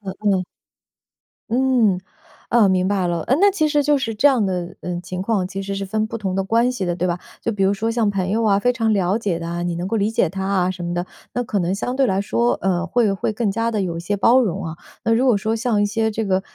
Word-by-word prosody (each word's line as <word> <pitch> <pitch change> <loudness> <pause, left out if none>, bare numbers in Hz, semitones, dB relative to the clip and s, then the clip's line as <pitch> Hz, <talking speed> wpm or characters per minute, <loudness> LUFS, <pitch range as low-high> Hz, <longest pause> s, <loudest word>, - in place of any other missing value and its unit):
呃 195 -2 -6
呃。 195 -3 +1 1.1
嗯。 240 -6 +2 0.5
呃， 230 -4 +4
明 185 -1 +2
白 190 -2 0
了， 170 -1 -1
呃， 255 - +1
那 405 +1 +6
其 335 -6 +1
实 295 -1 +2
就 290 0 +3
是 225 -4 -3
这 275 +7 +5
样 245 -7 +2
的， 180 -2 -3
呃， 175 -1 -4
情 180 0 -6
况 195 -2 0
其 195 0 -5
实 200 0 -4
是 195 0 -3
分 215 +2 -1
不 225 - -5
同 200 -4 -3
的 195 - 0
关 230 +5 +2
系 245 -7 -3
的， 175 -1 -1
对 180 +1 -1
吧？ 175 0 -1 0.2
就 - - 0
比 200 -3 0
如 195 +1 +3
说 220 +3 -1
像 230 -2 +1
朋 190 -2 -1
友 225 +2 +1
啊、 200 -2 +4
非 245 +5 +2
常 225 -2 +1
了 195 0 +1
解 200 -7 -1
的 165 0 -5
啊， 170 0 -3
你 175 -1 -1
能 175 +2 -3
够 225 - 0
理 210 +1 0
解 185 - +2
他 190 +1 -4
啊 185 -2 +1
什 180 -2 -6
么 175 0 -3
的， 175 0 -1 0.3
那 245 - 0
可 215 -3 -2
能 180 0 0
相 245 +5 -3
对 270 -1 +3
来 190 0 +1
说， 235 +4 +1
呃， 185 -1 0
会 225 -1 +2
会 195 +2 -2
更 215 -1 -1
加 230 +3 -1
地 215 - 0
有 170 -3 -3
一 - - -4
些 205 +4 -2
包 235 +6 +5
容 195 -5 -1
啊。 160 -1 -5 0.3
那 225 - +1
如 240 +4 +3
果 245 -5 +4
说 220 +2 -1
像 220 -2 +1
一 - - +3
些 220 +2 0
这 220 0 -2
个， 190 -2 +1
200 Hz, 300 characters per minute, -21 LUFS, 185-230 Hz, 1.1 s, 那